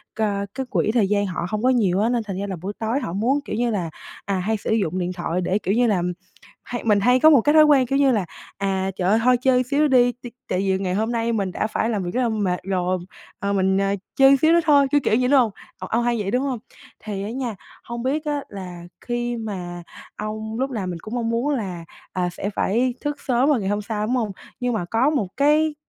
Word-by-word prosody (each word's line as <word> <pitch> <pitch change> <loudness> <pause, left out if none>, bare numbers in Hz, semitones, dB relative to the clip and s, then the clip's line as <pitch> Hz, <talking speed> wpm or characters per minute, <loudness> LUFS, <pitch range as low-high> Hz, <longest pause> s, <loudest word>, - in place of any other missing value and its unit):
cờ, 205 -2 -1
cái 265 0 -3
quỹ 215 - +1
thời 220 -5 +3
gian 205 -1 +2
họ 180 -2 -3
không 215 +3 -3
có 255 - +4
nhiều 200 -8 +2
á, 220 +3 +2
nên 240 -2 0
thành 195 -3 -5
ra 200 - -3
là 190 - -3
buổi 200 +3 -4
tối 225 +4 0
họ 220 -11 -4
muốn, 245 +9 +1
kiểu - - -4
như 240 +1 0
là, 180 -6 -2 0.4
à, 200 - -1
hay 215 +4 0
sử 205 - -4
dụng 190 -5 0
điện 180 0 -2
thoại 175 0 -2
để, 185 +2 +1
kiểu 195 +1 -1
như 240 +1 +3
là, 190 -5 +2 0.6
hay 240 - -5
mình 210 -3 +3
hay 250 +5 +4
có 310 +4 +7
một 280 -6 +6
cái 295 +5 +3
thói 310 - +9
quen, 290 -4 +5
kiểu 275 - +1
như 275 -2 +4
là, 210 -6 +1 0.3
à, 195 -1 -1
"Trời 180 +1 0
ơi, 220 - +4
thôi 250 0 +5
chơi 255 0 +3
xíu 280 +4 0
nữa 305 - +5
đi, 245 -2 +4
ti 245 - -7 0.2
tại 180 - 0
vì 190 -1 +1
ngày 185 -2 -1
hôm 220 +4 0
nay 235 0 0
mình 195 -4 -1
đã 215 - -1
phải 225 - -1
làm 210 -5 -1
việc 175 - -3
rất 255 - +1
là 240 - +1
mệt 200 -5 -1
rồi, 185 -1 0 0.4
ờ, 200 0 -1
mình, 190 -1 +2
ờ, 195 0 +1 0.2
chơi 270 0 +6
xíu 315 +4 +4
nữa 340 - +6
thôi." 285 -3 +5
Kiểu, 290 - +4
kiểu 215 - +2
vậy, 250 0 +1
đúng 280 - +6
hông? 230 -4 +2 0.3
Ô - - -6
ông 235 +2 0
hay 240 -1 +1
vậy, 195 0 -2
đúng 255 +2 +1
hông? 260 -5 -2 0.4
Thì 200 -2 -4
á 210 - -4
nha, 245 -2 -3 0.3
hông 235 0 -6
biết 295 +4 -1
á 295 -1 -1
là 180 -3 -8 0.2
khi 240 0 -2
mà 180 -5 -5 0.3
ông 220 +2 -5
lúc 265 - 0
nào 205 -7 -3
mình 175 -2 -4
cũng 220 +3 -6
mong 230 -1 -1
muốn 250 +6 0
là, 185 -8 -5 0.3
à, 180 -1 0
sẽ 200 - -4
phải 240 +5 0
thức 290 -1 -3
sớm 255 +1 +2
vào 280 -6 +3
ngày 195 - -2
hôm 205 +1 0
sau, 210 0 -3
đúng 250 - +1
hông? 225 -4 -1 0.3
Nhưng 245 -1 0
mà 200 -5 -2
có 230 +10 +2
một 275 -11 0
cái 300 +2 +3
220 Hz, 270 wpm, -22 LUFS, 195-255 Hz, 0.6 s, thói